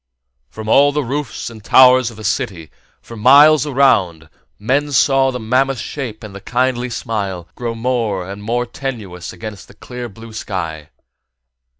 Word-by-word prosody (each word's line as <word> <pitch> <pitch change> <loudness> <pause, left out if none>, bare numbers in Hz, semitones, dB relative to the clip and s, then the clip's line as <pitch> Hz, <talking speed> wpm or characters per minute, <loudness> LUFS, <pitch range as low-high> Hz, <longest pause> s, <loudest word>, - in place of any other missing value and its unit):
From 110 - -9
all 140 +5 +5
the 150 0 -1
roofs 135 -1 -4
and 110 -2 -12
the - - -17
towers 130 -2 +6
of 115 - -13
the 110 - -10
city, 100 - -3 0.3
for 115 - -11
miles 145 +6 +6
and 140 - -5
miles 130 -10 +4
around, 80 - -22 0.3
men 140 +7 0
saw 135 0 +3
the 125 -1 -4
mammoth 130 +4 +1
shape 115 -1 -6
and 105 -2 -9
the 100 - -9
kindly 125 +2 -1
smile 100 -7 -4
grow 120 -2 -4
more 115 -6 -2
and 100 +1 -8
more 120 +3 -1
tenuous 110 -9 -6
against 100 +3 -9
the 100 - -17
clear 125 +2 -8
blue 115 +2 -13
sky. 85 -9 -5
115 Hz, 175 wpm, -17 LUFS, 105-130 Hz, 0.3 s, towers